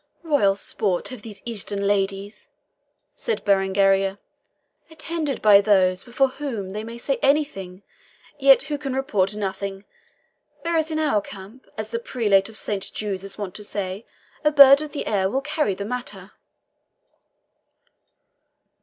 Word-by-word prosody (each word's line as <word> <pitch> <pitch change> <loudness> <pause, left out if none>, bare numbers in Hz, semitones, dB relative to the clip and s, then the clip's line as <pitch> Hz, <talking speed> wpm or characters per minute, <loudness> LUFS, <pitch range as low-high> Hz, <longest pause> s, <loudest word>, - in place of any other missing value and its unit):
"Royal 285 -12 +2
sport 195 -2 -2
have 255 -4 -9
these 210 -2 -11
Eastern 205 -3 -2
ladies," 200 0 -2 0.6
said 465 - -4
Berengaria, 195 0 +2 0.7
"attended 315 -4 -4
by 205 -2 +7
those 185 -3 +3
before 260 +2 +1
whom 240 -9 -5
they 210 +2 -5
may 230 +1 -8
say 270 +3 -2
anything, 205 -11 0 0.6
yet 270 -1 +6
who 290 +1 -4
can 275 -3 -4
report 210 -7 0
nothing. 195 -1 -4 0.8
Whereas 330 -2 0
in 315 - -2
our 295 -10 +1
camp, 205 +6 -12
as 215 0 -5
the 230 - -2
Prelate 210 -5 +1
of 220 - -6
Saint 200 -2 -3
Jude's 195 -3 -4
is 195 - -9
wont 200 -4 -5
to 210 - -8
say, 200 0 -5 0.4
a 300 - +4
bird 280 -1 +8
of 305 -1 -6
the 290 - -4
air 195 -3 +1
will 265 +6 -1
carry 295 -8 -1
the 200 - -5
matter." 250 +2 -6
210 Hz, 145 wpm, -23 LUFS, 195-275 Hz, 0.8 s, bird